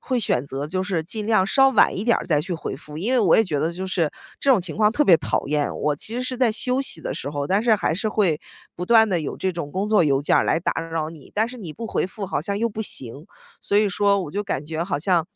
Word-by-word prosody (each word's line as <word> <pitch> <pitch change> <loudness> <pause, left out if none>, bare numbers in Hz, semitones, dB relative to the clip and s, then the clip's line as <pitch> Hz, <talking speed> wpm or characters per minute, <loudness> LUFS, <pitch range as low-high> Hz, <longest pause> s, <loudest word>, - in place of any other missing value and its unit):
会 255 -2 -1
选 135 - 0
择 140 +2 -4
就 185 +4 -2
是 185 -5 -1
尽 210 +5 -5
量 215 -4 +3
稍 270 +6 +5
晚 - - +3
一 195 - -2
点 235 -1 +3
儿 - - -5
再 150 -4 +2
去 175 +3 -4
回 165 - -5
复， 150 0 -11
因 225 +9 -1
为 255 - +3
我 200 -8 +4
也 225 - +5
觉 150 -6 -2
得 160 +2 0
就 185 +2 -5
是 170 -5 0 0.3
这 280 - +2
种 240 -8 +5
情 175 -1 -5
况 215 0 +3
特 295 - +2
别 175 - +7
讨 - - -2
厌， 145 0 -1
我 150 -1 0
其 220 - -3
实 250 - -2
是 255 0 -3
在 245 -3 +2
休 250 +4 +1
息 270 - -2
的 - - -4
时 140 - -5
候， 145 -1 -3
但 200 +3 +1
是 230 -2 +4
还 160 - 0
是 215 +4 -1
会 185 -8 +1 0.4
不 180 - -4
断 220 0 +6
地 175 -4 0
有 150 - -5
这 190 -1 -1
种 165 -4 -5
工 195 +3 -2
作 210 -5 +4
邮 140 -2 +2
件 - - +3
儿 - - +3
来 165 - +1
打 - - -1
扰 165 -1 -3
你， 155 -4 -14
但 220 +3 +1
是 250 - -9
你 175 -7 -7
不 230 +8 -7
回 195 - -1
复 195 +1 -7
好 - - -2
像 200 +6 -3
又 235 - +1
不 220 0 -5
行。 140 - -5 0.4
所 200 - 0
以 210 -1 +4
说 200 +1 +2
我 150 - -7
就 205 +4 -2
感 145 -7 -3
觉 160 +1 -3
好 160 -6 -2
像 170 0 +1
185 Hz, 320 characters per minute, -23 LUFS, 160-215 Hz, 0.4 s, 别